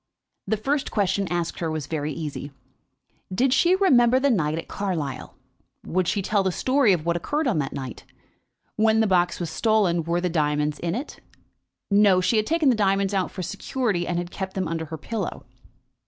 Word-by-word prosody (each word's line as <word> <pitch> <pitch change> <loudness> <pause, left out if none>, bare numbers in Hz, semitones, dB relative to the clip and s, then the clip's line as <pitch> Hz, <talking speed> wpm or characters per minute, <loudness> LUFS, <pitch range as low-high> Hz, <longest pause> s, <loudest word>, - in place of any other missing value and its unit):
The 220 - +1
first 275 +6 -1
question 200 -1 0
asked 175 -1 -2
her 165 - -1
was 155 -3 -3
very 150 0 -3
easy. 150 -2 -5 0.8
Did 250 +7 +2
she 350 +5 +4
remember 255 -10 +4
the 280 +1 +2
night 155 -7 0
at 165 - -6
Carlisle? 170 -9 -4 0.5
Would 185 0 0
she 200 0 0
tell 205 +1 +1
the 190 - 0
history 260 +4 +2
of 170 -4 0
what 170 0 +1
occurred 295 - -1
on 210 -11 +1
that 135 -2 -2
night? 130 -3 -7 0.7
When 220 0 +3
the 220 - +4
box 180 -3 +2
was 170 -3 -3
stolen, 200 -5 +2
were 170 +2 0
the 180 - 0
diamonds 150 -2 0
in 170 +1 -2
it? 265 +5 -6 0.7
No; 200 -2 +5
she 185 +5 +2
had 215 - +1
taken 320 -3 +3
the 250 - +4
diamonds 195 -1 +1
out 190 -2 0
for 185 - -6
security, 200 -1 -2
and 175 - -1
had 175 0 -4
kept 190 -1 -5
them 185 -3 -1
under 165 0 -3
her 160 +1 -7
pillow. 205 +4 -5
185 Hz, 195 wpm, -24 LUFS, 165-220 Hz, 0.8 s, No